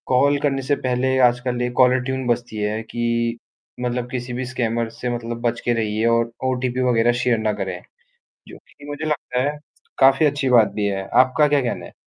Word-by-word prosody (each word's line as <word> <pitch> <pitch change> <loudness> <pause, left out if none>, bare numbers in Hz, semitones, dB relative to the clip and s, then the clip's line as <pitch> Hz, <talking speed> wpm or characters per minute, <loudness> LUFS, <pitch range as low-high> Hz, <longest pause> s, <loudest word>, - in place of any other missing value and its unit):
Call 140 +3 +3
करने 135 -2 0
से 135 +2 0
पहले 130 0 0
आजकल 125 0 -2
1 125 0 -2
कॉलर 130 0 +5
ट्यून 130 0 -3
बजती 120 -1 -2
है 105 +1 -2
कि 115 0 -1 0.4
मतलब 125 0 -2
किसी 125 -1 -4
भी 130 +1 -3
स्कैमर 120 -2 -2
से 125 - -3
मतलब 120 0 -5
बच 120 -1 -1
के 120 - +2
रहिए 110 -1 -1
और 115 0 +2
ओटीपी 130 -1 -1
वग़ैरह 120 0 +3
शेयर 125 -2 +2
ना 110 -1 0
करें। 95 -2 -4 0.7
जो - - -11
कि 145 - -16
मुझे 145 +2 -5
लगता 140 -4 -2
है 150 - -6 0.4
काफ़ी 135 +3 +5
अच्छी 145 -2 0
बात 120 -4 +6
भी 105 - -1
है। 95 -1 -3 0.2
आपका 130 +3 +2
क्या 145 -1 +2
कहना 120 -2 -3
है? - - -13
125 Hz, 200 wpm, -21 LUFS, 115-130 Hz, 0.7 s, बात